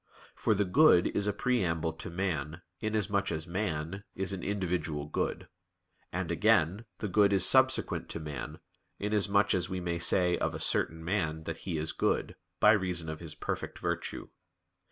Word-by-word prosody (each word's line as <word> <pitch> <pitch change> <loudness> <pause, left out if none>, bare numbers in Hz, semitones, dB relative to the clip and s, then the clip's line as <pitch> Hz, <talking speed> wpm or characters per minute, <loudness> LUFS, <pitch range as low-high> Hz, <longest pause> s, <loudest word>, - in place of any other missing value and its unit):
For 110 - +1
the 100 +1 +1
good 110 - +5
is 100 0 +1
a - - +3
preamble 90 -8 0
to 80 - -6
man, 85 -2 -3 0.2
inasmuch 105 -3 0
as 80 -1 -2
man 90 0 -3
is 95 +1 -1
an 95 - -5
individual 85 -7 -2
good; 75 - -3 0.6
and, 90 -1 -3
again, 100 +1 +2
the 105 - -3
good 100 +1 +4
is 95 -2 +5
subsequent - - +3
to - - -4
man, 75 -4 -6 0.4
inasmuch 100 -1 +2
as 90 -1 0
we 95 -1 -3
may 85 -1 -2
say 90 0 +2
of - - -1
a - - -5
certain 80 0 0
man 80 -4 -1
that 80 +1 -5
he 85 - -1
is 80 +1 -1
good, - - -1 0.2
by 105 - +7
reason 90 -6 0
of 80 - -5
his 80 -3 -7
perfect - - -4
virtue. 85 -1 -3
90 Hz, 170 wpm, -30 LUFS, 80-100 Hz, 0.6 s, by